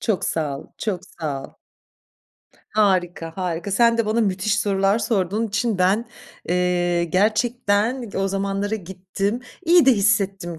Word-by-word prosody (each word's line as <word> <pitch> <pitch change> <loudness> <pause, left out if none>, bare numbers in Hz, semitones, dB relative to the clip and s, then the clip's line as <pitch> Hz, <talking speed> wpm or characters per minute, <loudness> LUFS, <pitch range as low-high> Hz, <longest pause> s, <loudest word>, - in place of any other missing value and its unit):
Çok 215 -5 -1
sağ 145 -4 -2
ol, - - -12
çok 195 -5 -2
sağ 150 -7 -5
ol. - - -10 1.2
Harika, 180 -5 +1
harika. 180 +1 -3
Sen 230 +3 +3
de 225 - +1
bana 220 +2 +1
müthiş 210 +1 0
sorular 195 +1 +2
sorduğun 215 0 0
için 210 0 -1
ben, 200 +6 +2 0.4
eee, 175 -1 +1
gerçekten, 215 +5 +1
eee, 210 -4 -6
o 195 - 0
zamanlara 195 +2 -2
gittim, 190 +3 -3 0.2
iyi 340 -3 +5
de 265 - +8
hissettim 195 -5 0
195 Hz, 140 wpm, -22 LUFS, 180-220 Hz, 1.2 s, de